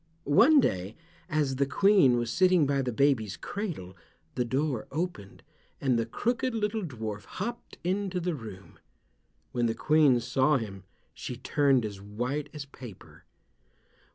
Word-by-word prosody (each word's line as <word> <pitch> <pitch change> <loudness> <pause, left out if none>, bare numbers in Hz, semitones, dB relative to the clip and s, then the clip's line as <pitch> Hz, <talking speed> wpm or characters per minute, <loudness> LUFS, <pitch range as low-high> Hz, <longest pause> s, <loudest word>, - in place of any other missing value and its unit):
One 245 - +6
day, 95 - -1 0.3
as 145 -4 0
the 140 0 +1
Queen 185 -6 +4
was 120 -1 -1
sitting 185 -4 +4
by 140 0 +1
the 125 -2 -2
baby's 115 -6 +1
cradle, 165 - -5 0.4
the 125 - 0
door 130 0 -1
opened, 155 - -5 0.4
and 130 -3 +1
the 115 - -1
crooked 240 - -1
little 215 0 -1
dwarf 110 - -5
hopped 235 - -6
into 190 +1 -1
the 175 0 -1
room. 110 -8 -10 0.7
When 120 -1 +1
the 115 - -1
Queen 150 -5 +4
saw 130 +4 +2
him 100 -5 -7 0.3
she 125 - -6
turned 135 -2 +2
as 100 -2 -6
white 125 +9 -3
as 150 -2 -7
paper. 125 -7 -13
135 Hz, 145 wpm, -28 LUFS, 115-175 Hz, 0.7 s, One